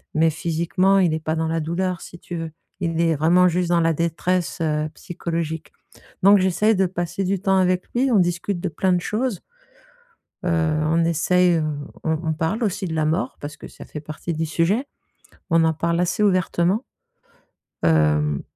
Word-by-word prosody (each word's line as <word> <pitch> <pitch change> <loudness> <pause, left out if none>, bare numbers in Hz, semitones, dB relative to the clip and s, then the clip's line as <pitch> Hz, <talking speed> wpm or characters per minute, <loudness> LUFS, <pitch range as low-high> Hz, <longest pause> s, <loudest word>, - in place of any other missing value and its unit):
mais 160 +1 +4
physiquement, 170 +5 +1
il 175 -4 +3
est 160 - -1
pas 160 0 -1
dans 160 0 -1
la 165 +1 -1
douleur, 175 +3 -2
si 175 - -11
tu 175 - -7
veux. 165 -1 -5 0.3
Il 165 -2 0
est 165 -1 +2
vraiment 170 +5 +4
juste 175 0 0
dans 170 -1 +3
la 165 0 +2
détresse, 170 +1 -1
heu, 155 -1 0
psychologique. 165 -2 -4 0.5
Donc 200 +2 +8
j'essaie 190 +4 +2
de 190 0 +2
passer 175 +1 -3
du 195 +1 0
temps 195 -1 +2
avec 185 -1 +2
lui. 260 +2 +2
On 215 - +5
discute 175 +1 0
de 185 - -1
plein 185 +4 +1
de 175 - +1
choses. 220 0 -2 1.0
Heu, - - -2 0.4
on 165 +2 +2
essaie, 175 +2 +3
heu, 160 - 0 0.4
on 160 0 0
on 160 - +1
parle 165 +9 -1
aussi 195 -2 -1
de 165 - -4
la 155 -1 0
mort 160 +5 -1
parce 145 +1 -7
que - - -10
ça - - -12
fait 150 - -7
partie 155 +3 -6
du 160 +1 -2
sujet. 170 - +1 0.6
On 165 -1 +4
en 160 0 +2
parle 170 +2 -1
assez 180 +4 0
ouvertement. 185 +2 +1 1.0
Heu, 75 -2 +2
170 Hz, 190 wpm, -22 LUFS, 160-185 Hz, 1.0 s, Donc